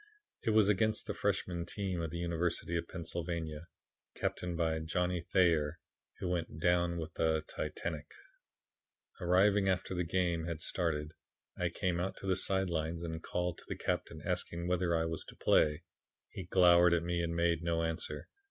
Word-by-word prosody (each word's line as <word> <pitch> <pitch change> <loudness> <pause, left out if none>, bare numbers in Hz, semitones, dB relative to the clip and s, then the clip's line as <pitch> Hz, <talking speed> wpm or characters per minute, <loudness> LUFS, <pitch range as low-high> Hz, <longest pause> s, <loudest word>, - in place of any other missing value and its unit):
It - - 0
was 110 -2 +5
against 110 +2 +2
the - - -3
Freshmen 85 -2 -1
team 95 -1 -3
of 80 - -2
the 85 - -5
University 85 0 -1
of 85 0 -1
Pennsylvania, 85 -2 -4 0.5
captained 90 -1 -2
by 80 -1 +1
Johnny 90 +2 0
Thayer 85 -4 +2 0.4
who - - -3
went 85 -3 -2
down 85 0 +2
with 80 -1 -5
the 80 -1 +1
Titanic. 80 -4 -4 1.1
"Arriving 95 +3 +4
after 95 0 0
the 90 -1 0
game 85 -1 0
had 85 -2 -3
started, 80 -3 -1 0.4
I 90 - 0
came 90 -1 -1
out 95 +2 -2
to - - -8
the 95 -1 +2
side 95 0 +2
lines 80 +1 -2
and 80 -1 -4
called 90 0 -2
to - - -13
the - - -4
captain - - -2
asking 85 0 -2
whether 90 -1 +1
I 80 - +1
was 80 0 -2
to - - -12
play. 75 +2 +3 0.5
He 95 - -6
glowered 90 -1 +6
at 85 - 0
me 85 0 0
and 85 0 -2
made 85 -1 +2
no 85 -1 0
answer. 80 0 -3
85 Hz, 170 wpm, -33 LUFS, 80-90 Hz, 1.1 s, glowered